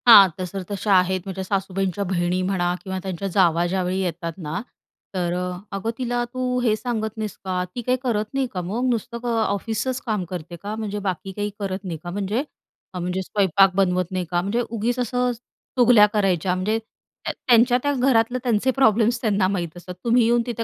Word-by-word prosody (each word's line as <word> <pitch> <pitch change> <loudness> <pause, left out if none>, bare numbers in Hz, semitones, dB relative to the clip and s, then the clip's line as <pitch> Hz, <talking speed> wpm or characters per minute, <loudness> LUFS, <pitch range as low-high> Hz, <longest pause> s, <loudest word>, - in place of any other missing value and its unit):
हां, 205 -5 +10
तशर 185 +1 -4
तशा 200 0 0
आहेत, 185 0 0
म्हणजे 190 -1 -4
सासूबाईंच्या 195 0 -1
बहिणी 180 -1 0
म्हणा 180 -2 0
किंवा 190 -1 -4
त्यांच्या 190 0 -3
जावा 175 -3 +3
ज्यावेळी 185 +1 -1
येतात 170 -2 -3
ना 160 -1 -4 0.5
तर 175 -2 -1
अ, 180 0 -3 0.2
"अगं, 195 +3 -2
तिला 245 -1 -1
तू 255 -1 0
हे 225 -3 +3
सांगत 220 -2 -3
नाहीस 215 -2 -3
का? 185 -1 0
ती 245 - -2
काही 250 +2 +1
करत 220 -4 0
नाही 270 -1 +1
का 180 - -2
मग 210 +8 -2
नुसतं 235 0 -2
क - - -7
ऑफिसचं 225 +1 0
काम 215 -5 0
करते 175 -1 -6
का? 205 +1 -3
म्हणजे 210 -2 -3
बाकी 185 +2 -5
काही 205 +2 -2
करत 195 -1 -3
नाही 175 -4 -4
का, 175 - -5
म्हणजे 200 +4 -1 0.5
हा 180 - -4
म्हणजे 180 +2 -2
स्वयंपाक 195 -1 +3
बनवत 185 -2 +1
नाही 185 -1 -1
का? 175 0 +2
म्हणजे 205 +6 0
उगीच 235 +2 -1
असं 250 +1 +1
अ, - - +1 0.5
चुगल्या 240 -4 +7
करायच्या, 185 -3 +1
म्हणजे 205 +4 0 0.5
त्या - - -1
त्यांच्या 240 0 +6
त्या 285 0 +2
घरातलं 250 -2 +2
त्यांचे 245 +1 +2
प्रॉब्लेम्स 235 -2 +3
त्यांना 200 -4 +2
माहीत 175 -4 -3
असतं, 180 +1 -8
तुम्ही 240 +1 +4
येऊन 235 +1 +3
तिथं 235 -2 -3
200 Hz, 195 wpm, -23 LUFS, 185-230 Hz, 0.5 s, हां